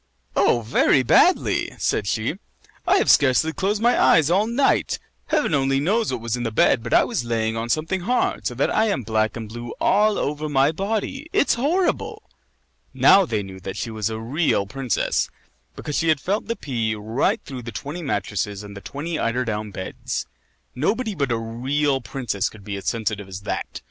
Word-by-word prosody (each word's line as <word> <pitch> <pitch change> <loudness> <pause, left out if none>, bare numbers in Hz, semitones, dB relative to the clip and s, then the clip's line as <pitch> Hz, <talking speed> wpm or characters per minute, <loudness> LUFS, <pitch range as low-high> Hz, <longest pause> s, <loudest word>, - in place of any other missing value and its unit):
"Oh, 120 - +3
very 125 +3 +3
badly!" - - +3
said 100 - 0
she. 110 - -1 0.5
"I 380 +3 +5
have - - +1
scarcely 145 +3 +4
closed 205 +4 -1
my 240 +1 +4
eyes 160 -1 +5
all 200 +4 +3
night. 250 +4 +1 0.3
Heaven 295 - +1
only 135 -1 +2
knows 210 - +1
what 125 -3 -3
was 115 0 -2
in 125 - -4
the 120 - -1
bed, 115 +2 +3
but 115 - -6
I - - +6
was - - -2
lying 115 -1 -1
on 115 +1 -3
something 160 +8 0
hard, 245 +7 0
so - - -4
that - - +1
I 220 - +4
am 140 - -1
black 110 +1 0
and 115 -2 -6
blue 120 +2 -7
all 210 +1 +3
over 150 +1 -2
my 140 +1 +3
body. 220 - -3
It's - - +3
horrible!" 365 - -1 0.6
Now 195 -3 +6
they 105 -5 -1
knew 95 -1 -9
that 95 0 -6
she 115 - -3
was 110 -1 -2
a 110 - -4
real 120 -2 0
princess 125 +2 -1 0.5
because 145 - -4
she 165 - 0
had 155 -2 +3
felt 200 +8 -2
the 230 - -1
pea 115 - -2
right 110 +5 0
through 130 -3 -7
the 120 0 -7
twenty 145 - -6
mattresses 105 - -2
and 100 0 -10
the 100 - -8
twenty 155 +7 -4
eider 125 +2 0
down 105 -1 -3
beds. 95 -1 -5 0.5
Nobody 215 - -1
but 140 -8 -1
a 115 - +1
real 130 +5 -1
princess 115 -4 -2
could 105 -2 -15
be 100 0 -5
as 100 - -7
sensitive 110 -3 -2
as 95 +1 -7
that. - - -4
130 Hz, 195 wpm, -23 LUFS, 110-175 Hz, 0.6 s, I